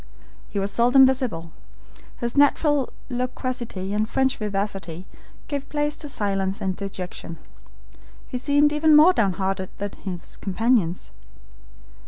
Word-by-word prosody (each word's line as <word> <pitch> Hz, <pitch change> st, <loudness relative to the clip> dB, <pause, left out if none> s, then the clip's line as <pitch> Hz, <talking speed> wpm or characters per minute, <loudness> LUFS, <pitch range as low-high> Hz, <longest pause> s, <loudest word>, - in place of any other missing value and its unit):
He -, -, -5 dB
was 200 Hz, 0 st, 0 dB
seldom 250 Hz, +3 st, +6 dB
visible; 245 Hz, -, -1 dB, 0.7 s
his 235 Hz, 0 st, -3 dB
natural 290 Hz, -1 st, +3 dB, 0.2 s
loquacity 245 Hz, -6 st, -3 dB
and 215 Hz, +1 st, 0 dB
French 265 Hz, +1 st, +1 dB
vivacity 195 Hz, -4 st, -3 dB, 0.4 s
gave 285 Hz, -2 st, -4 dB
place 295 Hz, 0 st, -1 dB
to 295 Hz, -, -6 dB
silence 195 Hz, -4 st, -1 dB
and 190 Hz, -1 st, -2 dB
dejection. 185 Hz, -4 st, -6 dB, 0.9 s
He 250 Hz, -, -4 dB
seemed 290 Hz, +2 st, +3 dB
even 305 Hz, 0 st, +4 dB
more 315 Hz, +5 st, +8 dB
downhearted 190 Hz, -, 0 dB
than 205 Hz, 0 st, -4 dB
his 180 Hz, -3 st, -7 dB
companions. 200 Hz, -3 st, 0 dB
225 Hz, 120 wpm, -24 LUFS, 195-270 Hz, 0.9 s, more